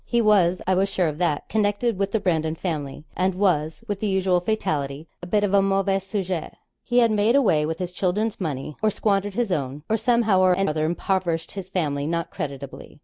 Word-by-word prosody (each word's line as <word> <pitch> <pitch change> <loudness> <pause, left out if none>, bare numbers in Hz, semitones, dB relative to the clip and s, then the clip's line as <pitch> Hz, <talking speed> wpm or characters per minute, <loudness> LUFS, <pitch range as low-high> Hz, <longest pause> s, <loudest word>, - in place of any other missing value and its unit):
He 240 - 0
was 190 -5 +3
I 190 - +2
was 190 +2 +2
sure 180 -3 +1
of 150 0 -4
that 165 -5 0
connected 210 0 0
with 195 0 0
the 220 - +1
Brandon 160 -4 0
family; 150 -5 -4
and 185 0 0
was, 175 -2 0
with 205 -2 -3
the 215 - -1
usual 190 -2 +2
fatality, 155 -7 -2
a 175 - -7
bit 205 +3 +1
of 200 -1 0
a 200 - +6
mauvais 195 0 +1
sujet. 190 -4 -4 0.3
He 245 - -1
had 235 -2 +5
made 215 +3 +3
away 160 - +3
with 160 0 -3
his 180 0 -4
children's 205 +4 -1
money, 150 -3 -4
or 215 - +3
squandered 200 -1 0
his 235 -4 0
own; 145 -3 -2
or 220 - +1
somehow 225 -4 +2
or 185 -1 +5
another 160 -5 0
impoverished 170 -1 -1
his 190 -2 -7
family 145 -6 -1
not 170 +1 -2
creditably. 140 +1 -7
185 Hz, 205 wpm, -24 LUFS, 160-205 Hz, 0.3 s, a